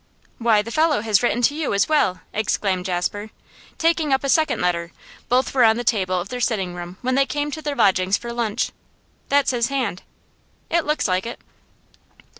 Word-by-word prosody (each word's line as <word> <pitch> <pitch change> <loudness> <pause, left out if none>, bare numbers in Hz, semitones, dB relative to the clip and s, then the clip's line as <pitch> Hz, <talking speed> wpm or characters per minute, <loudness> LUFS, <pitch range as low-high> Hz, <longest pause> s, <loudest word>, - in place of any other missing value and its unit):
'Why, 225 -3 +3
the 230 - -7
fellow 310 -3 +2
has 215 -3 +2
written 245 0 0
to 280 - +4
you 300 -8 -2
as 200 - +2
well!' 240 - +1
exclaimed 195 -3 -1
Jasper, 190 +4 -2 0.5
taking 325 -2 +1
up 265 +1 +2
a 275 - -1
second 315 +2 +2
letter; 170 -1 -1 0.4
both 255 +2 +2
were 260 -2 +4
on 220 0 +5
the 240 - -3
table 185 -6 +1
of 180 - -6
their 250 0 -4
sitting 195 -7 -1
room 175 +1 -8
when 255 +1 0
they 275 +1 +3
came 295 0 -2
to 315 - -5
their 295 -2 -3
lodgings 190 -4 +3
for 235 0 -7
lunch. 235 -1 -1 0.6
'That's 280 -1 +3
his 235 -2 0
hand.' 245 -9 -2 0.7
'It 335 -1 +2
looks 300 -4 0
like 185 +3 0
it. 235 - -7
235 Hz, 195 wpm, -22 LUFS, 190-275 Hz, 0.7 s, on